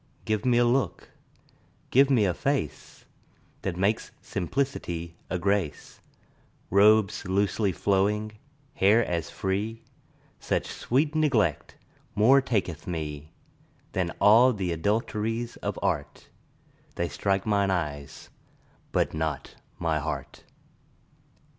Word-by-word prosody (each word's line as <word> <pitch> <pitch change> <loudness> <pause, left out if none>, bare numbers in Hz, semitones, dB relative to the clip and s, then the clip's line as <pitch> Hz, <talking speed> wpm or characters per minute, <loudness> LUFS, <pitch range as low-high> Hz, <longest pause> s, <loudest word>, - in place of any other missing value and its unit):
Give 110 +1 -1
me 125 -1 +3
a 120 - +4
look, 120 -4 0 0.8
give 135 +2 +5
me 120 -6 +4
a 90 - +1
face 135 - -3 0.6
That 90 -3 -3
makes 100 +4 0
simplicity 90 -6 -3
a 90 - -1
grace; 95 -5 -2 0.7
Robes 105 +2 +4
loosely 100 +2 +1
flowing, 105 +4 0 0.4
hair 110 +1 +4
as 85 -2 -2
free: 105 +4 -3 0.6
Such - - -1
sweet 145 +5 0
neglect 130 - +1 0.4
more 125 +6 +6
taketh 95 - -2
me 75 -3 -5 0.6
10 95 -2 0
Than - - -7
all 115 +5 +7
th' 95 -3 -2
adulteries 110 +6 -1
of - - -4
art; - - -2 0.7
They 85 - -1
strike 100 +2 -1
mine 100 -2 +2
eyes, 75 -6 -4 0.6
but - - +1
not 80 -3 -3 0.2
my - - 0
heart. - - -6
100 Hz, 110 wpm, -27 LUFS, 85-115 Hz, 0.8 s, all